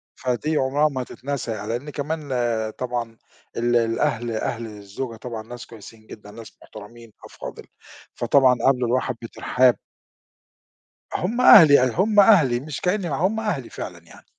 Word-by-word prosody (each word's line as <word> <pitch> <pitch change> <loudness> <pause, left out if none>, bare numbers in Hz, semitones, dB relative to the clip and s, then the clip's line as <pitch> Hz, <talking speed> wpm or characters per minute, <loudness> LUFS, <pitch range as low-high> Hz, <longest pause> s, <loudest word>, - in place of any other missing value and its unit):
فدي 140 +5 -2
عُمرها 145 +3 +1
ما 130 -2 -4
هتتنسى 130 -1 -5
يع 105 -1 -5
لإن 120 +7 -4
كمان 150 0 -5 0.5
طبعًا 120 -2 -4 0.4
ال 120 +1 +1
الأهل 115 0 0
أهل 115 +1 -3
الزوجة 105 +3 -7
طبعًا 115 -1 -7
ناس 120 +1 -10
كويسين 110 0 -14
جدًا، 105 -1 -12
ناس 115 -1 -13
محترمين 110 +1 -13
أفاضِل، - - -10 0.5
فطبعًا 130 -3 +3
قابلوا 125 -2 +2
الواحد 130 +1 -1
بتِرحاب. 125 +2 +1 1.4
هم 225 +8 -2
أهلي 155 - +8
أ 130 - +1
هم 205 - +2
أهلي 165 - +5
مش 145 +1 -7
كإنّي 180 -1 -1
ما 140 - -2
هم 190 +8 0
أهلي 190 - -3
فعلًا - - -8
يعني. - - -17
125 Hz, 145 wpm, -22 LUFS, 115-150 Hz, 1.4 s, أهلي